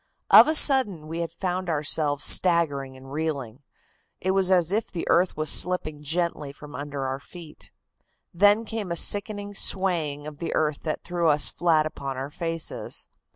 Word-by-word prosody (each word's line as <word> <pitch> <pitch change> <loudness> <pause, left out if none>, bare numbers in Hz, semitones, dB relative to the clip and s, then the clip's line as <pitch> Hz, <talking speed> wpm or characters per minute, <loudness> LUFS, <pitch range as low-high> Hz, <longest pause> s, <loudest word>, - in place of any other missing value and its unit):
"Of - - +9
a 310 - +1
sudden 230 - +4
we 165 +2 -6
had 165 -2 -4
found 180 +1 -4
ourselves 150 -2 -1
staggering 145 -7 +2
and 135 +1 -14
reeling. 140 -5 -5 0.6
It 190 - -1
was 190 -1 +1
as 180 -2 +2
if 215 +2 -2
the 170 - -6
earth 180 -1 +1
was 155 -1 +3
slipping 155 -5 +1
gently 155 -1 -2
from 145 +1 -14
under 145 -1 -6
our 135 +1 -4
feet. 165 +1 -13 0.6
Then 205 +5 +3
came 215 -4 -5
a - - -2
sickening 205 +3 +2
swaying 170 -8 0
of 150 -1 -10
the 170 - -4
earth 150 -2 -1
that 155 - -4
threw 175 -1 -2
us 150 0 +2
flat 160 -3 +1
upon 140 -3 -6
our 135 +2 -6
faces. 165 0 -4
165 Hz, 170 wpm, -24 LUFS, 145-185 Hz, 0.6 s, Of